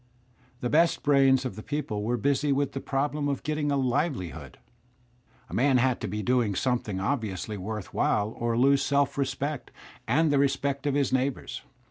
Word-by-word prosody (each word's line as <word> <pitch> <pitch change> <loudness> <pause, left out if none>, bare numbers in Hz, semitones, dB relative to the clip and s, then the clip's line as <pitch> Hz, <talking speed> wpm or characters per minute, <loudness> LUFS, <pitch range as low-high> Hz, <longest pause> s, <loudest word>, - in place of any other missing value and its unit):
The 120 - -1
best 165 +2 +3
brains 135 -2 +4
of 125 - -4
the 110 - -7
people 135 -6 -3
were 120 +4 0
busy 140 +4 +1
with 140 +1 +1
the 135 - -4
problem 145 +1 -1
of 140 -1 -2
getting 150 -1 -1
a 140 - +1
livelihood. 130 - -2 0.9
A - - -12
man 130 +1 +3
had 130 0 +1
to - - -2
be 105 +2 -3
doing 120 -3 +1
something 110 -3 -1
obviously 105 -2 -2
worth 105 +1 -6
while 105 0 +1
or 115 0 -1
lose 135 +2 +4
self 140 0 +1
respect 140 +1 -2 0.4
and 160 0 +3
the 140 - +3
respect 140 0 0
of 140 - +1
his 140 -3 +1
neighbours. 130 0 -1
135 Hz, 175 wpm, -27 LUFS, 115-140 Hz, 0.9 s, brains